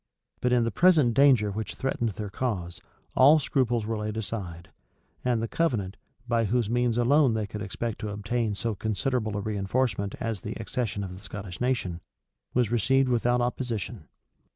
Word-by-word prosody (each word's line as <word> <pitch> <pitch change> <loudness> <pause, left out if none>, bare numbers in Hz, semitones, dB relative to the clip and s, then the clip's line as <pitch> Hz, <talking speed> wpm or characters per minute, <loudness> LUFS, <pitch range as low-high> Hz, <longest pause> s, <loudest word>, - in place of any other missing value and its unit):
But 125 - +1
in 125 -1 +4
the 115 - 0
present 155 - +4
danger 125 -5 +5
which 105 0 -4
threatened 125 -3 -1
their 105 +1 -6
cause, 90 -9 -3 0.3
all 140 +5 +7
scruples 125 -6 0
were 110 0 -2
laid 105 +1 -3
aside; 95 -6 -5 0.5
and 120 -3 +1
the - - -1
covenant, 110 - 0 0.3
by 115 -1 +2
whose 115 +1 0
means 120 -1 +1
alone 130 0 +4
they 110 -1 -1
could 105 +1 -7
expect 105 +3 -4
to 105 - -4
obtain 105 +1 -1
so 115 +2 -2
considerable 110 +1 -1
a 100 - -3
reënforcement 100 0 -1
as 110 -5 -3
the 105 - -5
accession 110 -3 -2
of 95 -2 -6
the 95 - -12
Scottish 100 -2 -8
nation, 105 -9 -1 0.5
was 120 -3 +2
received 130 +4 +3
without 120 0 +2
opposition. 120 -4 -3
115 Hz, 170 wpm, -27 LUFS, 105-125 Hz, 0.5 s, all